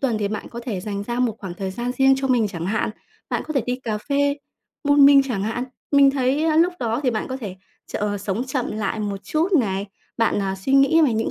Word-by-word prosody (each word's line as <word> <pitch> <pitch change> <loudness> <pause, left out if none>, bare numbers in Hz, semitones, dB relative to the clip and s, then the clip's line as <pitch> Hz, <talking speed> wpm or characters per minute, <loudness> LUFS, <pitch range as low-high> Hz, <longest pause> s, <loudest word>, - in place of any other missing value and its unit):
tuần 240 -6 0
thì 205 - -1
bạn 215 0 -5
có 235 - -7
thể 215 -7 -4
dành 200 0 -4
ra 240 +2 -3
một 235 -4 0
khoảng 190 -4 -7
thời 190 +1 -4
gian 240 +5 -3
riêng 270 +1 +4
cho 270 0 -2
mình 240 -4 +3
chẳng 170 -4 -5
hạn, 215 +3 0 0.4
bạn - - -1
có 310 - -5
thể 270 - +3
đi 250 0 -1
cà 215 -4 -2
phê 285 +4 0 0.5
một 285 0 +3
mình 280 0 +8
chẳng 240 -8 -3
hạn. 225 +4 -2 0.3
Mình 280 -1 +6
thấy, 270 +2 +1
a, 315 -1 +2
lúc 345 +3 +4
đó 230 +1 -1
thì 255 - +2
bạn 220 -2 -2
có 260 - -3
thể 205 -8 -7 0.4
ch - - -1 0.2
sống 205 +4 -2
chậm 255 -1 -2
lại 215 +1 -2
một 205 -1 -2
chút 330 +5 0
này, 200 - +1 0.3
bạn, 225 -3 +1
à, 190 0 -1
suy 195 +7 -3
nghĩ 275 +4 +5
về 265 -7 +3
những 225 +1 -1
240 Hz, 255 wpm, -22 LUFS, 210-275 Hz, 0.5 s, mình